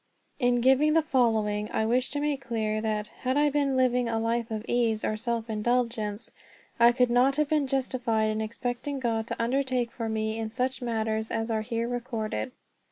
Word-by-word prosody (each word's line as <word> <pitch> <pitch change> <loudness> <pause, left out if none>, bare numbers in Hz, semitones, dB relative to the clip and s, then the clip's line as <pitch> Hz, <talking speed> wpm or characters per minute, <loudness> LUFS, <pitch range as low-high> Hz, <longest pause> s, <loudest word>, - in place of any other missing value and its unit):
'" - - -41
In 245 -1 +2
giving 265 +5 +4
the 325 0 +4
following 220 -7 +1
I 220 - 0
wish 245 +3 +1
to 290 - -2
make 290 -2 -1
clear 215 -4 -1
that, 215 -1 -2
had 260 +2 0
I 295 0 +3
been 275 -2 +1
living 250 -2 +2
a 225 - 0
life 230 +1 -1
of 220 0 -4
ease 230 -3 +1
or 215 - 0
self 230 +1 -2
indulgence, 225 -1 -1 0.5
I 235 +1 +7
could 245 0 +2
not 255 +3 +4
have 300 -1 +1
been 300 -3 +2
justified 245 -5 0
in 215 0 -2
expecting 245 +5 -3
God 225 -3 -1
to - - -5
undertake 250 0 0
for 230 -2 -4
me 220 0 -2
in 220 -1 -3
such 255 +3 -2
matters 220 -2 -1
as 225 0 -2
are 220 -1 0
here 230 +1 -2
recorded. 230 - -3
235 Hz, 195 wpm, -27 LUFS, 220-255 Hz, 0.5 s, I